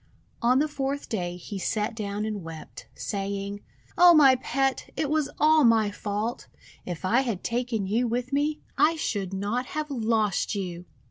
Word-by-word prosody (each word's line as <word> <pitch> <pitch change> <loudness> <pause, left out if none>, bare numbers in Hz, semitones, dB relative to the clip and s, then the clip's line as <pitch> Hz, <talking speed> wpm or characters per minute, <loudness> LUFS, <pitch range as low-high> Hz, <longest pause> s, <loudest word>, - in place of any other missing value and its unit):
On 245 +2 +4
the 300 +3 +2
fourth 280 -1 -3
day 175 -5 -3
he 195 +3 -7
sat 210 +4 -1
down 205 -1 -3
and 210 -2 -3
wept, 165 -2 -10
saying: 200 0 -4 0.2
— - - -31
"O 350 -1 +9
my 275 -4 +8
Pet, 270 +1 -1
it 300 -2 -1
was 305 -2 +1
all 310 0 +5
my 225 -3 +4
fault! 210 +3 -3 0.4
If 175 0 -5
I 235 +7 +3
had 230 -8 -3
taken 235 -3 -1
you 230 +6 +1
with 245 +3 -2
me, 295 +2 0 0.2
I 305 +3 +5
should 200 - -2
not 205 +6 -2
have 305 -1 -2
lost 220 -5 0
you!' 180 -3 -5
225 Hz, 175 wpm, -26 LUFS, 200-270 Hz, 0.4 s, O